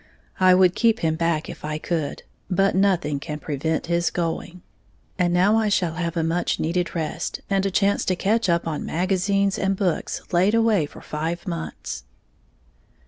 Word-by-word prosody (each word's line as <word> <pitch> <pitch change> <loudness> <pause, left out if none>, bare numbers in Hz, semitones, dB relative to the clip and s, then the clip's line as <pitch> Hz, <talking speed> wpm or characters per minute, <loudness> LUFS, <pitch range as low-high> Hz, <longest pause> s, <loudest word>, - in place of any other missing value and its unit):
I 185 -1 +6
would 185 -1 +5
keep 225 +1 +2
him 160 -1 +2
back 165 -1 0
if - - -9
I 150 0 -2
could; 155 -2 -3 0.3
but 195 +1 +2
nothing 180 -7 +1
can 150 +1 -5
prevent 150 +2 -2
his 170 0 +1
going. 170 +1 -3 0.6
And 175 -1 +2
now 190 +5 +4
I 220 -1 +2
shall 175 -5 +1
have 170 0 -3
a 165 - +1
much 165 +2 0
needed 175 +3 -1
rest, 160 -2 -3
and 195 0 +2
a - - 0
chance 200 +1 +2
to 185 - +1
catch 210 +3 +1
up 170 0 +1
on 155 -2 -3
magazines 195 +2 0
and 195 0 +1
books 180 -4 -1
laid 185 +5 +3
away 220 -9 +3
for - - -13
five 165 +4 -4
months. 165 - -5
175 Hz, 175 wpm, -23 LUFS, 165-195 Hz, 0.6 s, I